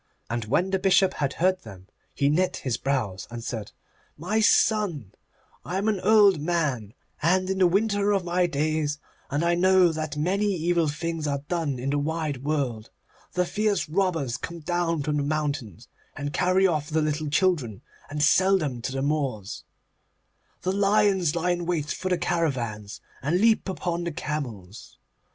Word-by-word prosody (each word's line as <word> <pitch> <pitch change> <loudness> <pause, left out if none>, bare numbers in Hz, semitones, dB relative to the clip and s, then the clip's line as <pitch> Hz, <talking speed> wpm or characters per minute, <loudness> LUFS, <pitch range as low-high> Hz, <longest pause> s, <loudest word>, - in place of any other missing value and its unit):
And 120 -2 -2
when 175 - +1
the 190 - +1
Bishop 190 0 +3
had 140 -1 -2
heard 185 +2 +1
them 95 -1 -12 0.3
he 140 - +1
knit 180 +6 +1
his 130 -4 0
brows, 115 -8 -2
and 120 -1 -7
said, 110 -4 -5 0.5
'My 185 +8 -1
son, 205 - +2 0.5
I 180 - -3
am 200 +3 -1
an 210 -3 +1
old 205 -3 +5
man, 145 -10 -1 0.3
and 185 +4 +2
in 190 - -2
the 185 - +6
winter 205 +2 +1
of 195 -2 +1
my 175 +1 +1
days, 155 -1 -1 0.3
and 145 +4 0
I 170 - +3
know 185 0 +4
that 155 -2 -4
many 190 +7 +1
evil 170 -1 +1
things 160 +1 -3
are 140 -1 -2
done 160 -6 -1
in 130 +3 -2
the 145 - +1
wide 150 -3 -2
world. 135 -7 -2 0.4
The 180 0 +1
fierce 210 0 0
robbers 165 -7 0
come 170 0 -7
down 165 -1 -1
from 150 +1 -1
the 145 - 0
mountains, 145 - -3 0.3
and 145 0 -4
carry 185 +1 +3
off 155 -4 0
the 155 0 +1
little 150 0 -1
children, 145 - 0 0.3
and 150 0 -1
sell 190 +6 +4
them 140 -9 -3
to 130 - -3
the 135 0 -2
Moors. 135 -9 -2 1.0
The 185 - +1
lions 200 -4 +2
lie 175 +1 +1
in 175 -1 -2
wait 155 -4 -1
for 185 - -3
the 180 - +2
caravans, 130 -12 -2 0.2
and 150 +6 +1
leap 220 -2 +3
upon 175 -2 -3
the 170 - -2
camels. 120 - -6
160 Hz, 175 wpm, -25 LUFS, 140-185 Hz, 1.0 s, the